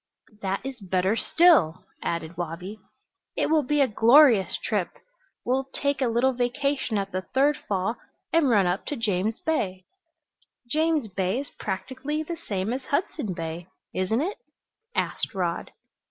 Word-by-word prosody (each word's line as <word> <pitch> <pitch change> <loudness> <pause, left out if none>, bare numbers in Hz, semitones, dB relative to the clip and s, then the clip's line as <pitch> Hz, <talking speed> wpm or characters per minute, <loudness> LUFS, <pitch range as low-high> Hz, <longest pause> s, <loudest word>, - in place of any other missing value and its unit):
"That 195 +4 -2
is 270 -2 -5
better 190 +2 +1
still," 230 - +4 0.2
added 170 0 -3
Wabi. 175 +5 -5 0.6
"It - - +1
will 315 -1 +5
be 295 +2 +1
a 275 - +5
glorious 230 -1 +5
trip! - - -1 0.6
We'll 265 +2 +1
take 280 -1 0
a 260 - +3
little 240 +3 +2
vacation 255 -1 0
at 195 -1 -2
the 185 - -2
third 270 +10 +2
fall 200 +4 0 0.4
and 325 -5 +4
run 205 -5 +4
up 180 +2 -1
to 295 - -2
James 215 -2 -1
Bay." 190 -13 -1 0.8
"James 310 -1 +1
Bay 190 +3 -1
is 285 - -10
practically 260 +9 -4
the 340 +2 -4
same 195 +2 -1
as 260 +1 -4
Hudson 285 - -1
Bay, 165 +1 -5 0.3
isn't 185 +7 0
it?" 380 +7 -3 0.6
asked - - -2
Rod. 175 -3 -1
230 Hz, 150 wpm, -26 LUFS, 185-280 Hz, 0.8 s, will